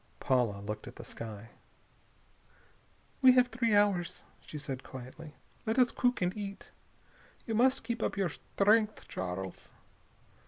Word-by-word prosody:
Paula 120 Hz, -6 st, +1 dB
looked 105 Hz, +1 st, -5 dB
at -, -, -9 dB
the -, -, -9 dB
sky. 110 Hz, -1 st, -8 dB, 1.7 s
"We 260 Hz, -1 st, +9 dB
have 250 Hz, -1 st, +5 dB
three 230 Hz, -2 st, +1 dB
hours," 200 Hz, -4 st, +2 dB, 0.2 s
she 155 Hz, -, -7 dB
said 135 Hz, -3 st, -5 dB
quietly. 130 Hz, +5 st, -10 dB, 0.3 s
"Let 220 Hz, +3 st, +1 dB
us 250 Hz, -2 st, +5 dB
cook 245 Hz, -6 st, +1 dB
and 180 Hz, +1 st, 0 dB
eat. 200 Hz, -2 st, -7 dB, 0.7 s
You 225 Hz, -, -2 dB
must 260 Hz, +4 st, +3 dB
keep 235 Hz, 0 st, -3 dB
up -, -, -1 dB
your 195 Hz, -3 st, +1 dB
strength, 210 Hz, +6 st, +1 dB
Charles." 95 Hz, 0 st, -5 dB
195 Hz, 135 wpm, -32 LUFS, -, 1.7 s, We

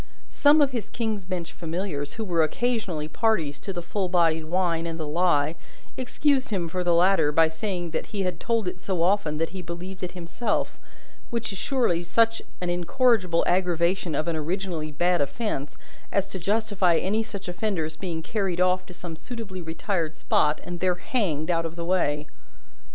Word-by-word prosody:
Some 295 Hz, +1 st, +6 dB
of 280 Hz, -2 st, +4 dB
his 235 Hz, -5 st, -3 dB
King's 220 Hz, -5 st, -2 dB
Bench 180 Hz, -2 st, -4 dB
familiars, 160 Hz, -4 st, -3 dB
who 225 Hz, -, -3 dB
were 170 Hz, -4 st, +2 dB
occasionally 180 Hz, -3 st, 0 dB
parties 160 Hz, -8 st, +1 dB
to 195 Hz, -, -5 dB
the 175 Hz, -2 st, -4 dB
full 190 Hz, +1 st, -2 dB
bodied 165 Hz, -3 st, +3 dB
wine 170 Hz, -1 st, 0 dB
and 165 Hz, 0 st, -4 dB
the 155 Hz, -, -2 dB
lie, 155 Hz, -1 st, +2 dB, 0.4 s
excused 265 Hz, +1 st, +1 dB
him 185 Hz, -6 st, -1 dB
for 180 Hz, +2 st, -2 dB
the 175 Hz, -1 st, +3 dB
latter 170 Hz, -4 st, +4 dB
by 160 Hz, +2 st, +5 dB
saying 175 Hz, 0 st, -3 dB
that 160 Hz, -, -2 dB
he 205 Hz, -, -3 dB
had 180 Hz, -1 st, -2 dB
told 230 Hz, -4 st, 0 dB
it 180 Hz, -, -3 dB
so 180 Hz, -3 st, -1 dB
often, 175 Hz, -5 st, +2 dB
that 165 Hz, +1 st, 0 dB
he 190 Hz, 0 st, -6 dB
believed 180 Hz, +3 st, -7 dB
it 180 Hz, -, -4 dB
himself 180 Hz, +6 st, -2 dB, 0.5 s
which 235 Hz, -1 st, -2 dB
is 190 Hz, -, -6 dB
surely 245 Hz, -11 st, +1 dB
such 225 Hz, +6 st, +2 dB, 0.2 s
an 180 Hz, -1 st, 0 dB
incorrigible 180 Hz, 0 st, +3 dB
aggravation 175 Hz, -1 st, +1 dB
of 155 Hz, -, -1 dB
an 170 Hz, -, 0 dB
originally 165 Hz, -1 st, -2 dB
bad 175 Hz, +2 st, +2 dB
offence, 145 Hz, -, -2 dB, 0.3 s
as 200 Hz, -1 st, +1 dB
to 190 Hz, -, -5 dB
justify 200 Hz, -2 st, +2 dB
any 210 Hz, +4 st, +1 dB
such 200 Hz, -3 st, -6 dB
offender's 175 Hz, -4 st, -2 dB
being 165 Hz, -4 st, -4 dB
carried 195 Hz, -3 st, -1 dB
off 185 Hz, 0 st, +2 dB
to 180 Hz, -, -11 dB
some 175 Hz, -2 st, -7 dB
suitably 205 Hz, -1 st, -6 dB
retired 165 Hz, 0 st, -2 dB
spot, 150 Hz, -1 st, +2 dB
and 175 Hz, -1 st, -6 dB
there 185 Hz, 0 st, +2 dB
hanged 175 Hz, -, 0 dB
out 165 Hz, -1 st, +1 dB
of 165 Hz, 0 st, -4 dB
the 170 Hz, -1 st, -4 dB
way. 150 Hz, -5 st, +1 dB
180 Hz, 185 wpm, -26 LUFS, 165-200 Hz, 0.5 s, Some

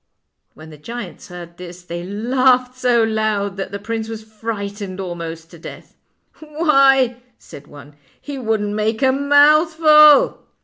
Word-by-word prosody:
When 155 Hz, +1 st, -14 dB
the 150 Hz, -, -14 dB
giants 235 Hz, +8 st, -9 dB
heard 175 Hz, -2 st, -11 dB
this 180 Hz, 0 st, -11 dB
they 170 Hz, 0 st, -7 dB
laughed 250 Hz, +5 st, 0 dB
so 245 Hz, -2 st, +1 dB
loud 215 Hz, -3 st, -2 dB
that 195 Hz, -1 st, -5 dB
the 200 Hz, -, -5 dB
prince 225 Hz, +2 st, -5 dB
was 220 Hz, -1 st, -7 dB
frightened 205 Hz, -3 st, -7 dB
almost 165 Hz, -3 st, -7 dB
to 170 Hz, -, -14 dB
death. -, -, -12 dB, 0.3 s
" -, -, -34 dB, 0.2 s
Why," 270 Hz, -6 st, +3 dB, 0.2 s
said 145 Hz, +1 st, -14 dB
one, 145 Hz, 0 st, -15 dB, 0.2 s
" -, -, -35 dB
he 285 Hz, -2 st, -8 dB
wouldn't 215 Hz, -3 st, -2 dB
make 220 Hz, +3 st, -2 dB
a 260 Hz, -, +4 dB
mouth 290 Hz, +4 st, +3 dB
ful." 305 Hz, -2 st, +5 dB
220 Hz, 160 wpm, -18 LUFS, 185-260 Hz, 0.3 s, ful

